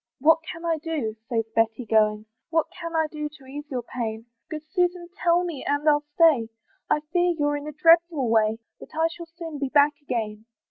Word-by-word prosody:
"What 320 Hz, +4 st, +5 dB
can 335 Hz, 0 st, -8 dB
I 325 Hz, -2 st, +1 dB
do?" 295 Hz, -9 st, -3 dB
says 225 Hz, -2 st, 0 dB
Betty, 225 Hz, +2 st, +1 dB
going, 215 Hz, -1 st, +2 dB, 0.2 s
"What 325 Hz, -1 st, +2 dB
can 335 Hz, -1 st, -6 dB
I 320 Hz, 0 st, +3 dB
do 300 Hz, -1 st, -4 dB
to 290 Hz, -3 st, -17 dB
ease 290 Hz, +3 st, -8 dB
your 255 Hz, -4 st, -3 dB
pain? 225 Hz, -2 st, -4 dB, 0.2 s
"Good 310 Hz, -1 st, -5 dB
Susan 355 Hz, -2 st, 0 dB
tell 350 Hz, -2 st, +2 dB
me, 335 Hz, -6 st, -5 dB
and 285 Hz, +2 st, -1 dB
I'll 295 Hz, -1 st, +4 dB
stay; 300 Hz, -10 st, +5 dB, 0.4 s
"I 300 Hz, -, +2 dB
fear 350 Hz, -1 st, +3 dB
you're 290 Hz, -1 st, +1 dB
in 290 Hz, +1 st, -5 dB
a -, -, -4 dB
dreadful 330 Hz, -2 st, +4 dB
way, 220 Hz, -1 st, +3 dB, 0.2 s
"But -, -, -11 dB
I 320 Hz, +1 st, +3 dB
shall 340 Hz, -1 st, -9 dB
soon 330 Hz, -3 st, -8 dB
be 275 Hz, -1 st, -1 dB
back 290 Hz, +1 st, +5 dB
again." 220 Hz, -5 st, -3 dB
295 Hz, 200 wpm, -25 LUFS, 240-330 Hz, 0.4 s, What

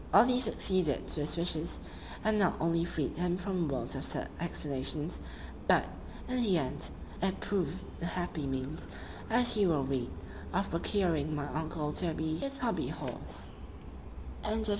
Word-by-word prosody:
All 205 Hz, +4 st, +9 dB
this 250 Hz, 0 st, +5 dB
succeeded 185 Hz, -8 st, +2 dB
to -, -, -1 dB
his 150 Hz, +3 st, -1 dB
wishes, 170 Hz, -1 st, +3 dB, 0.4 s
and 215 Hz, 0 st, +3 dB
not 190 Hz, -3 st, +3 dB
only 165 Hz, +1 st, +2 dB
freed 160 Hz, -5 st, -2 dB
him 180 Hz, 0 st, +1 dB
from 185 Hz, -2 st, -1 dB
a -, -, -1 dB
world 125 Hz, 0 st, -2 dB
of 135 Hz, -, -3 dB
sad -, -, -2 dB
explanations, 150 Hz, -1 st, +1 dB, 0.5 s
but, -, -, +5 dB, 0.4 s
in 255 Hz, -, -1 dB
the 200 Hz, -6 st, +4 dB
end, 145 Hz, 0 st, +1 dB, 0.3 s
it 190 Hz, 0 st, 0 dB
proved 185 Hz, -4 st, -1 dB, 0.2 s
the 170 Hz, -, -2 dB
happy 175 Hz, -4 st, -3 dB
means, 135 Hz, +3 st, -3 dB, 0.4 s
as 240 Hz, +1 st, +5 dB
you 200 Hz, -3 st, +4 dB
will 150 Hz, -4 st, +2 dB
read, 130 Hz, -2 st, -1 dB, 0.4 s
of 195 Hz, +2 st, 0 dB
procuring 165 Hz, -4 st, +1 dB
my 145 Hz, -1 st, -2 dB
uncle 155 Hz, -1 st, -2 dB
Toby 160 Hz, -1 st, 0 dB
his 275 Hz, +10 st, 0 dB
HOBBY -, -, 0 dB
HORSE. -, -, -6 dB
170 Hz, 155 wpm, -32 LUFS, 150-190 Hz, 0.5 s, All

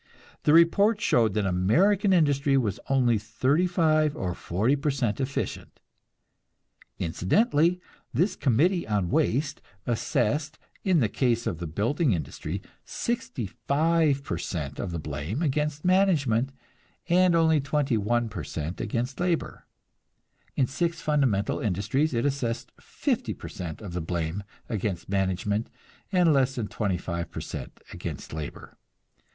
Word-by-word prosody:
The 150 Hz, -, +5 dB
report 200 Hz, +6 st, +5 dB
showed 115 Hz, -, +2 dB
that 105 Hz, -2 st, +1 dB
American 175 Hz, -, +3 dB
industry 145 Hz, -5 st, +3 dB
was 110 Hz, -7 st, 0 dB
only 125 Hz, -5 st, +3 dB
thirty 130 Hz, -, +1 dB
five 155 Hz, -4 st, +2 dB
or 90 Hz, -, -2 dB
forty 105 Hz, +10 st, 0 dB
per 145 Hz, +1 st, -1 dB
cent 130 Hz, -6 st, -1 dB
efficient. 135 Hz, +1 st, -4 dB, 1.2 s
Incidentally, 160 Hz, -, +2 dB, 0.3 s
this 175 Hz, -, +1 dB
"Committee 165 Hz, -, +2 dB
on 100 Hz, -5 st, 0 dB
Waste" 145 Hz, -1 st, +1 dB, 0.2 s
assessed, 140 Hz, +5 st, 0 dB, 0.3 s
in 180 Hz, -6 st, +3 dB
the 115 Hz, -, +3 dB
case 120 Hz, +1 st, 0 dB
of 85 Hz, -, -2 dB
the 85 Hz, -, -4 dB
building 120 Hz, -, +1 dB
industry, 75 Hz, -5 st, -4 dB, 0.2 s
sixty 235 Hz, -, -3 dB, 0.2 s
five 155 Hz, -1 st, +3 dB
per 85 Hz, -10 st, -3 dB
cent 75 Hz, -6 st, -4 dB
of 100 Hz, -, -2 dB
the 85 Hz, -, -3 dB
blame 75 Hz, -, -3 dB
against 150 Hz, +1 st, -1 dB
management 150 Hz, -, +3 dB, 0.6 s
and 180 Hz, 0 st, +4 dB
only 160 Hz, -2 st, +4 dB
twenty 145 Hz, -2 st, 0 dB
one 115 Hz, +3 st, +1 dB
per 105 Hz, -, -6 dB
cent 80 Hz, +3 st, -5 dB
against 120 Hz, +4 st, -2 dB
labor; 175 Hz, -2 st, -1 dB, 0.9 s
in 135 Hz, -, +3 dB
six 165 Hz, +6 st, -2 dB
fundamental 130 Hz, -10 st, +1 dB
industries 110 Hz, -, 0 dB
it 115 Hz, -, +1 dB
assessed 135 Hz, -5 st, -2 dB
fifty -, -, -2 dB
per -, -, -9 dB
cent 85 Hz, +2 st, -7 dB
of 95 Hz, -4 st, -7 dB
the 90 Hz, -, -2 dB
blame 85 Hz, +2 st, -2 dB, 0.3 s
against 100 Hz, -6 st, -3 dB
management 100 Hz, +3 st, 0 dB, 0.4 s
and 180 Hz, -4 st, +4 dB
less 135 Hz, -1 st, +2 dB
than 115 Hz, -4 st, -2 dB
twenty 100 Hz, -5 st, -1 dB
five 85 Hz, -1 st, -4 dB
per -, -, -6 dB
cent -, -, -7 dB
against -, -, -6 dB
labor. 80 Hz, -1 st, -7 dB
130 Hz, 140 wpm, -27 LUFS, 100-155 Hz, 1.2 s, The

